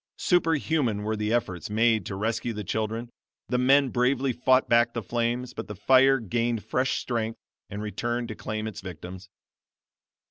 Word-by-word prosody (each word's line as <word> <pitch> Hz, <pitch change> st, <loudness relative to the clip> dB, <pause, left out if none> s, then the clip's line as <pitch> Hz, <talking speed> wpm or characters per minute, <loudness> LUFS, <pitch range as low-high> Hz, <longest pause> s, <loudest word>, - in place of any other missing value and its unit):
Superhuman 155 Hz, -, +1 dB
were 110 Hz, +1 st, -1 dB
the 105 Hz, 0 st, -2 dB
efforts 95 Hz, -8 st, -1 dB
made 110 Hz, -2 st, +2 dB
to 95 Hz, -, -4 dB
rescue 115 Hz, +3 st, -2 dB
the 105 Hz, -1 st, -5 dB
children; 110 Hz, +4 st, -3 dB, 0.4 s
the 125 Hz, -, +1 dB
men 135 Hz, +2 st, +4 dB
bravely 130 Hz, +2 st, +1 dB
fought 130 Hz, +2 st, +3 dB
back 120 Hz, 0 st, +3 dB
the 115 Hz, -, -2 dB
flames; 120 Hz, +3 st, -2 dB
but 110 Hz, -, -6 dB
the 105 Hz, -, -7 dB
fire 130 Hz, +6 st, +5 dB
gained 115 Hz, 0 st, -1 dB
fresh 130 Hz, +3 st, 0 dB
strength, 115 Hz, -2 st, -2 dB, 0.3 s
and 100 Hz, +1 st, -5 dB
returned 120 Hz, +3 st, -2 dB
to 110 Hz, -, -5 dB
claim 110 Hz, +1 st, -4 dB
its 105 Hz, -2 st, -6 dB
victims. 90 Hz, +1 st, -9 dB
115 Hz, 165 wpm, -26 LUFS, 105-125 Hz, 0.4 s, fire